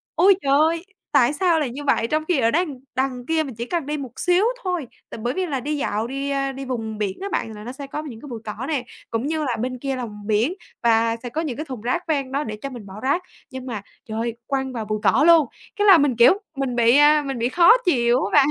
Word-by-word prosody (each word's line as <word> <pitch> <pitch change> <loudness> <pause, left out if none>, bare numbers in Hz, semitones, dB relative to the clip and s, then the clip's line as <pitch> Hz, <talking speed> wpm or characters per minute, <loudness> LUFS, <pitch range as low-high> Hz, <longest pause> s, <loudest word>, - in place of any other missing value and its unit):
ôi 375 +4 +6
trời 275 - 0
ơi, 330 +3 +2 0.3
tại 270 -1 +4
sao 335 +1 +2
lại 295 -5 -1
như 275 +5 -7
vậy? 250 -5 +2
Trong 310 +4 0
khi 350 -6 +2
ở 230 -2 +3
đằng 310 -4 -1 0.2
đằng 260 -2 -1
kia 320 +2 +1
mình 265 -6 -8
chỉ 235 +2 -4
cần 335 +1 -2
đi 300 +1 -2
một 260 -4 -8
xíu 360 +3 +3 0.2
thôi, 355 -8 -2 0.2
tại - - -8
bởi 245 - 0
vì 375 +3 -1
là 285 -6 -2
đi 295 +4 -2
dạo 220 -4 -1
đi, 275 +2 -3
a, 275 -1 0
đi 270 0 -7
vùng 225 -4 -4
biển 205 -3 -2
á 395 - -3
bạn 225 - -2
là 210 - -9
nó 240 - -6
sẽ 275 +1 -8
có 300 +2 -5
những 240 -7 -9
cái - - -10
bụi 235 -2 -6
cỏ 215 +3 -5
nè, 290 -6 -1 0.3
cũng 230 +4 -1
như 315 0 -1
là 255 -5 -1
bên 255 +2 -3
kia 270 +1 -2
là 250 -1 -3 0.2
biển 220 - +1 0.3
và 230 0 +3
sẽ 245 - -4
có 310 +7 -2
những 280 -7 -4
cái 310 - -4
thùng 260 -6 -7
rác 255 +11 -2
ven 280 -5 -1
đó 280 +2 0
để 215 -4 -5
cho 275 - -4
mình 240 -6 -9
bỏ 190 - -11
rác. 285 +8 +1 0.3
Nhưng 260 -1 -7
mà, 230 -6 -4 0.2
trời 220 -1 -5
ơi, 235 0 -2
quăng 265 -1 -2
vào 225 -3 -4
bụi 215 0 -2
cỏ 290 - +4
luôn, 330 -5 +6 0.3
cái 415 0 +1
là 380 - +9
mình, 285 -5 +2
kiểu, 235 +7 +7 0.2
mình 270 -3 -1
bị, 235 +2 +5
a, 295 0 +6
mình 270 -3 -3
bị 235 +2 +1
khó 340 +4 +6
chịu 245 -4 +3
á - - -4
bạn. 285 -2 +6
270 Hz, 280 wpm, -22 LUFS, 235-305 Hz, 0.3 s, là